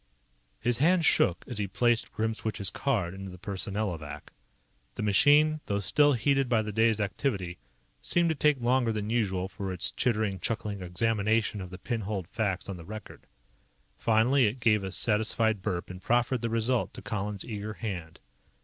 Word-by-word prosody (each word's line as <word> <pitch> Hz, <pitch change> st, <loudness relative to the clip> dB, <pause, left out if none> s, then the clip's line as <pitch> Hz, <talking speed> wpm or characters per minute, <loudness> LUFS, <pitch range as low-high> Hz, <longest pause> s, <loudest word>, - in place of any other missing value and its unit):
His 120 Hz, 0 st, +1 dB
hand 170 Hz, +3 st, +4 dB
shook 90 Hz, -10 st, +3 dB
as 120 Hz, -4 st, -4 dB
he 100 Hz, -, -1 dB
placed 115 Hz, +5 st, +1 dB
Grimswitch's 110 Hz, -3 st, -1 dB
card 105 Hz, -11 st, -1 dB
into 95 Hz, 0 st, -7 dB
the 90 Hz, -, -10 dB
Personnelovac. 95 Hz, -4 st, -4 dB, 0.6 s
The -, -, -3 dB
machine, 145 Hz, +9 st, +5 dB
though 100 Hz, -, 0 dB
still 145 Hz, +9 st, +3 dB
heated 135 Hz, +2 st, +1 dB
by 115 Hz, -3 st, +3 dB
the 105 Hz, -, -4 dB
day's 110 Hz, +1 st, +2 dB
activity, 100 Hz, -, -2 dB, 0.4 s
seemed 170 Hz, -1 st, +2 dB
to -, -, +2 dB
take 150 Hz, -1 st, +3 dB
longer 120 Hz, 0 st, +2 dB
than 105 Hz, 0 st, -3 dB
usual 95 Hz, -6 st, 0 dB
for 95 Hz, 0 st, -5 dB
its 90 Hz, -2 st, -1 dB
chittering, 110 Hz, -5 st, 0 dB
chuckling 105 Hz, 0 st, -3 dB
examination 105 Hz, +3 st, 0 dB
of 90 Hz, -, -7 dB
the 90 Hz, -, -8 dB
pin 115 Hz, +4 st, -3 dB
holed 100 Hz, -4 st, -4 dB
facts 100 Hz, -3 st, -2 dB
on 100 Hz, -2 st, -5 dB
the 85 Hz, -, -10 dB
record. 110 Hz, +5 st, -10 dB, 0.7 s
Finally, 120 Hz, +3 st, +3 dB
it 115 Hz, +5 st, -3 dB
gave 105 Hz, -3 st, +3 dB
a 95 Hz, -, -4 dB
satisfied 110 Hz, 0 st, +1 dB
burp 90 Hz, 0 st, -3 dB
and 90 Hz, 0 st, -9 dB
proffered 120 Hz, +3 st, +1 dB
the 115 Hz, -, -1 dB
result 115 Hz, +2 st, 0 dB
to -, -, -9 dB
Colihan's 105 Hz, -1 st, -4 dB
eager 105 Hz, -1 st, -5 dB
hand. 90 Hz, -8 st, -6 dB
110 Hz, 170 wpm, -29 LUFS, 95-120 Hz, 0.7 s, machine